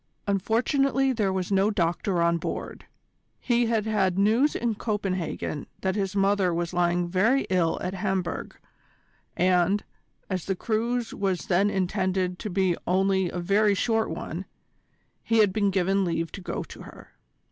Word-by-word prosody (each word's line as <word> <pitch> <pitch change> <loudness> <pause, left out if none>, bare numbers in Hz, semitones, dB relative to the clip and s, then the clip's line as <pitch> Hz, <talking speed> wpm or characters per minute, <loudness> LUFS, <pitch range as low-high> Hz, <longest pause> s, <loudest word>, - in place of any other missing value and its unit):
Unfortunately 260 - +1
there 210 -5 0
was 190 0 -2
no 195 +1 +3
doctor 175 -1 0
on 170 0 +2
board. - - -5 0.5
He 240 -1 +1
had 225 -2 0
had 195 -4 +1
news 225 +9 +3
in 235 -1 0
Copenhagen 195 -8 -3
that 190 0 0
his 195 -2 -2
mother 195 -2 +2
was 170 0 -2
lying 175 0 +1
very 215 +10 +2
ill 175 -3 +2
at 180 - -2
Hamburg, 190 -2 -3 0.8
and, 180 +2 +3 0.4
as 185 -3 -3
the 195 - -1
cruise 230 +4 -1
was 190 -3 -1
then 195 +3 +2
intended 185 -1 -1
to 210 - -4
be 185 -2 +1
only 190 0 +2
a - - -6
very 200 +4 +2
short 225 +2 +1
one, - - -5 0.8
he 225 - +1
had 210 -4 +4
been 205 -1 +2
given 195 +1 +1
leave 165 -2 -2
to 195 - -8
go - - -4
to - - -12
her. - - -13
195 Hz, 155 wpm, -26 LUFS, 180-215 Hz, 0.8 s, had